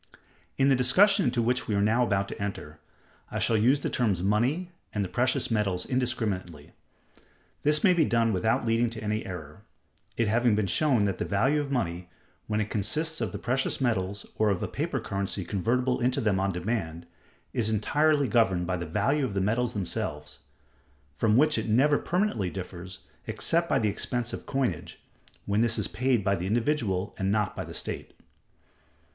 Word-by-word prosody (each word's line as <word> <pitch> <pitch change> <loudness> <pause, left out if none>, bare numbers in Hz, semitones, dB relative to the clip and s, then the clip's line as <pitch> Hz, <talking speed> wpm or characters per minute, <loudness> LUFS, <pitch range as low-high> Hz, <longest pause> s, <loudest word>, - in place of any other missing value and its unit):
In 135 +1 +4
the 135 - +5
discussion 195 - +4
into 120 -2 +1
which 125 +2 0
we 105 - 0
are - - +2
now 115 +4 +3
about 100 -4 0
to - - -7
enter, 75 -7 -5 0.5
I - - -4
shall 115 - +1
use 125 +7 +3
the - - -1
terms 100 -8 0
money 125 - +1 0.2
and 105 - -1
the - - -3
precious 125 +4 0
metals 100 -5 0
indiscriminately. 105 - -2 0.9
This 150 +1 +3
may 185 - +6
be 170 -2 +3
done 115 -4 +2
without 110 +5 +1
leading 115 +1 +2
to 115 -1 -7
any 105 +1 -1
error; 80 -5 -8 0.6
it 115 - +1
having 115 +1 +3
been 105 -1 +1
shown 125 0 +2
that 100 - -2
the - - 0
value 135 +9 +2
of 145 - -5
money, 90 -9 -2 0.4
when 105 0 0
it 110 0 -2
consists 155 +11 0
of - - -1
the - - -5
precious 130 +1 -1
metals, 100 -6 -1
or 110 -1 +3
of 100 -3 -1
a - - -1
paper - - -2
currency 100 -1 -3
convertible 125 +7 0
into 125 +1 +1
them 105 -4 +1
on 95 0 +1
demand, 90 -3 -3 0.5
is 110 -3 +1
entirely 145 +7 +2
governed 100 -6 +2
by 90 +1 -1
the 85 -1 -5
value 120 - +1
of 120 -7 -2
the - - +1
metals 115 +5 0
themselves: 75 -6 -3 0.7
from 110 +7 +2
which 155 +2 +4
it - - -4
never 140 +7 +4
permanently 180 - 0
differs, 90 0 -8 0.3
except 170 +1 0
by - - +3
the 110 -5 +1
expense 120 +3 -2
of - - -7
coinage, 130 - -2 0.5
when 100 +2 +1
this 115 -1 +2
is - - 0
paid 120 -1 0
by 100 0 +2
the 90 -1 -2
individual 110 -4 0
and 95 0 0
not 105 -1 0
by - - -4
the - - -9
state. - - -5
110 Hz, 185 wpm, -27 LUFS, 95-130 Hz, 0.9 s, may